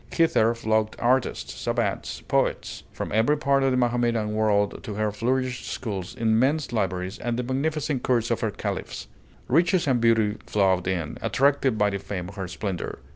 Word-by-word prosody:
Hither 120 -9 +3
flocked 110 -1 0
artists, 125 +2 0
savants, - - -2
poets - - -1
from - - -5
every 115 +8 +3
part 140 -1 +2
of 135 - +3
the 130 - +1
Mahometan 120 -3 +1
world 105 -2 +1
to 110 -5 -5
her 105 0 0
flourishing 125 +3 -1
schools, 100 -7 -5
immense 125 +6 +1
libraries, 95 -3 -2
and 120 0 -2
the 125 - -1
magnificent 140 +1 -1
courts 120 -2 +1
of 115 - 0
her 110 - +1
caliphs. - - -5 0.4
Riches 175 +5 +3
and 130 -4 +2
beauty 110 -2 +3
flowed 95 -3 +2
in, 85 -5 -2
attracted 135 -3 +2
by 105 -1 +2
the 100 - -3
fame 90 -2 -5
of 100 - -12
her 95 -2 -4
splendor. 95 0 -4
115 Hz, 170 wpm, -25 LUFS, 105-130 Hz, 0.4 s, Hither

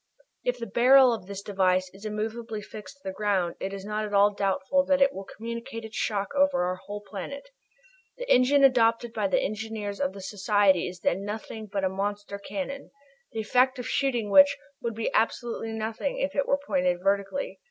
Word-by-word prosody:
If - - 0
the - - -5
barrel 255 +1 +6
of 200 -5 -6
this 200 0 -7
device 185 -2 +1
is 195 +3 -13
immovably 215 +1 -4
fixed 215 +5 -10
to 280 - -31
the 190 - -4
ground 190 -4 0
it 190 - -3
is 195 0 -7
not 210 +1 -2
at 205 -1 -3
all 205 +1 +5
doubtful 200 +7 +1
that 280 -1 +3
it 275 0 +4
will 195 +1 -7
communicate 230 +2 -7
its 220 - -10
shock 200 0 -1
over 280 -8 +3
our 180 +1 -1
whole 205 +2 -8
planet. 250 - -7 0.7
The - - -6
engine 275 - +5
adopted 235 -3 +4
by 210 -2 0
the - - +2
engineers 215 -1 -4
of 280 0 0
the 195 - -9
Society 200 -1 +2
is 180 -1 -9
then 190 +3 0
nothing 215 +1 -6
else - - -17
but 200 -1 -1
a - - +3
monster 200 +1 -4
cannon, 275 +5 -5 0.4
the 225 - -3
effect 255 +4 +2
of 250 0 -5
shooting 240 -7 0
which 285 +3 +7 0.2
would 230 -2 -3
be 225 - -2
absolutely 225 0 0
nothing 225 +5 -3
if 280 +1 -1
it 280 - 0
were 280 - +3
pointed 185 -10 0
vertically. 200 +7 -1
215 Hz, 200 wpm, -27 LUFS, 200-250 Hz, 0.7 s, which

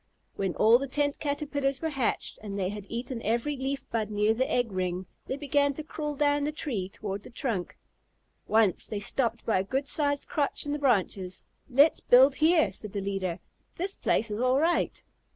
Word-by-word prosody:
When 190 -3 -2
all 225 +3 +6
the 275 - -3
Tent 285 +1 -1
Caterpillars 285 -2 -1
were 320 - -1
hatched, 270 -5 -2
and 200 -2 -5
they 185 -2 0
had 205 -1 -7
eaten 240 +1 -4
every 235 +7 0
leaf 270 +1 -3
bud 220 -2 -1
near 210 +1 +2
the 255 +4 -1
egg 245 -3 +1
ring, 185 0 -2 0.2
they 265 - -2
began 285 -1 +1
to 310 - -5
crawl 300 -1 -4
down 290 0 +2
the 295 - 0
tree 235 -11 -3
toward 200 0 -5
the - - -12
trunk. 235 - -3 0.7
Once 215 -4 +3
they 210 - -3
stopped 230 +2 -1
by 215 -4 +2
a - - 0
good 270 +7 -2
sized 285 -2 0
crotch 290 -1 -1
in 290 - -3
the 295 - -1
branches. 195 -8 0 0.3
"Let's 280 +5 +5
build 260 +3 +6
here," 315 - +3
said 210 0 -8
the 205 - -1
leader; 190 -3 -2 0.4
"this 380 +3 -2
place 225 - 0
is 210 - -3
all 255 +1 +3
right." 330 +4 +1
250 Hz, 195 wpm, -28 LUFS, 205-285 Hz, 0.7 s, all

